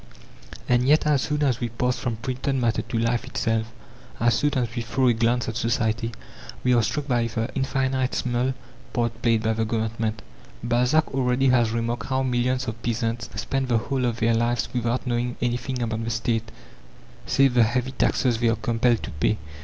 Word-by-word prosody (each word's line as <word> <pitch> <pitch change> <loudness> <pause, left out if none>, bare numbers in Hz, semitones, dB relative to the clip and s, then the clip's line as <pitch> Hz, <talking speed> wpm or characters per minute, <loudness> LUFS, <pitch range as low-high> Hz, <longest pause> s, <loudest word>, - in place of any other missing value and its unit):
And 125 +1 +3
yet 150 +2 +4
as 150 -3 +3
soon 150 +2 -1
as 130 -4 +1
we 120 - -2
pass 125 +2 -1
from 120 -3 -2
printed 130 +4 -2
matter 120 -3 +1
to 115 0 -4
life 115 +1 +1
itself, 115 -3 -1 0.5
as 120 0 +3
soon 145 +5 +1
as 120 -3 -1
we 120 - -1
throw 130 +3 +1
a - - +4
glance 120 +2 +1
at 115 - -3
society, 115 -1 0 0.5
we 125 - +3
are 120 - +4
struck 145 +6 -2
by 120 -3 +1
the 115 +1 -2
infinitesimal 130 -2 0 0.4
part 115 -1 -1
played 115 -2 +2
by 110 0 +2
the 115 0 0
Government. 110 0 -2 0.4
Balzac 125 +6 +2
already 130 0 +2
has 120 -3 +4
remarked 115 +1 -2
how 130 0 0
millions 125 0 0
of 115 0 -5
peasants 115 0 -2
spend 135 -1 -1
the 120 -2 +2
whole 130 +3 -1
of 120 -1 -1
their 115 +1 +3
lives 120 +1 +1
without 120 +1 -1
knowing 120 0 -1
anything 125 +1 -1
about 115 -1 -2
the 115 - -2
State, 115 -1 -1 0.8
save 135 -2 +4
the 120 - +4
heavy 125 +3 +1
taxes 125 -3 +1
they 120 - +2
are 115 - +2
compelled 120 0 +1
to - - -5
pay. 75 +9 0
120 Hz, 190 wpm, -24 LUFS, 115-130 Hz, 0.8 s, yet